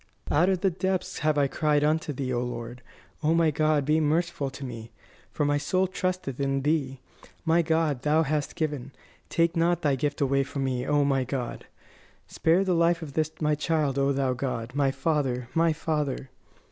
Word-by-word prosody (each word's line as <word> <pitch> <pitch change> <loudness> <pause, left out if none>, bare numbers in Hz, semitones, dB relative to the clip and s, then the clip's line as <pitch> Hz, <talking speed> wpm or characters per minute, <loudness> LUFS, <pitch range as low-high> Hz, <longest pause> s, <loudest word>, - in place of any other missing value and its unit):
"Out 170 +6 +4
of 185 -2 0
the 195 - +2
depths 185 +1 -2
have 155 -1 +1
I 145 - +4
cried 150 +1 +1
unto 155 0 +1
Thee, 130 -2 -3
O 120 - 0
Lord! 120 0 -5 0.4
O 160 +1 +2
my 165 -2 +3
God, 155 -1 +1
be 155 +2 +3
merciful 160 -1 0
to 135 +1 -8
me, 115 -3 -7 0.4
for 150 - -1
my 145 0 +2
soul 185 +6 +1
trusteth 185 -7 -3
in 135 -1 0
Thee. 140 -3 0 0.5
My 165 +1 +4
God, 160 -5 0
Thou 150 +3 +3
hast 150 -1 -2
given; 145 -5 -3 0.4
take 170 +1 +1
not 170 +1 +1
Thy 145 -2 +3
gift 145 +3 -2
away 140 -1 +2
from 135 0 -3
me, 130 -1 -2
O 145 -1 +3
my 135 -2 +2
God! 130 -1 -4 0.6
Spare 170 +4 +2
the 185 -2 +1
life 170 0 +2
of 145 -3 -8
this 155 0 +1
my 150 -1 +2
child, 150 -2 0
O 140 0 +2
Thou 135 -2 +1
God, 120 -2 -4
my 140 -1 +2
Father, 135 -5 -1
my 165 0 +3
Father!" 150 -4 -2
150 Hz, 190 wpm, -27 LUFS, 135-160 Hz, 0.6 s, Out